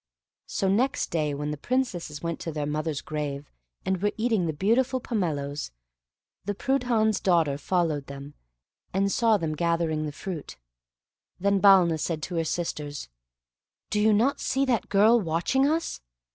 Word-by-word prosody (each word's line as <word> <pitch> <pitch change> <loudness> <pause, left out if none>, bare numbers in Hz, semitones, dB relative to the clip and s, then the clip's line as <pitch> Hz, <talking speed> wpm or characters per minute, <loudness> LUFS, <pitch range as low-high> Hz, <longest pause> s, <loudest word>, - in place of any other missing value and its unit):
So 195 - -1
next 255 +9 +1
day, 150 -3 0
when 150 +1 -3
the 150 - -4
Princesses 175 - -2
went 170 -1 -3
to 165 - -4
their 150 -1 -3
mother's 150 0 -2
grave, 145 -2 -5 0.3
and 190 -1 0
were 205 0 +1
eating 220 -6 +1
the - - 0
beautiful 240 - +1
pomeloes, 155 - -2 0.7
the 205 +1 -3
Prudhan's 240 -4 +1
daughter 165 -6 +2
followed 155 -2 -1
them, 140 +1 -9 0.6
and 195 +1 +2
saw 225 -1 +3
them 160 -4 -2
gathering 165 -1 0
the - - -4
fruit. 160 - -7 0.8
Then 200 +1 +2
Balna 185 -5 +6
said 155 0 -2
to 180 - -4
her 165 - +2
sisters, 150 - -4 0.8
"Do 210 - +1
you 220 +1 +5
not 230 +7 +2
see 270 +1 0
that 245 -4 0
girl 215 +4 +5
watching 180 - +1
us? 325 - -2
175 Hz, 155 wpm, -26 LUFS, 150-215 Hz, 0.8 s, Balna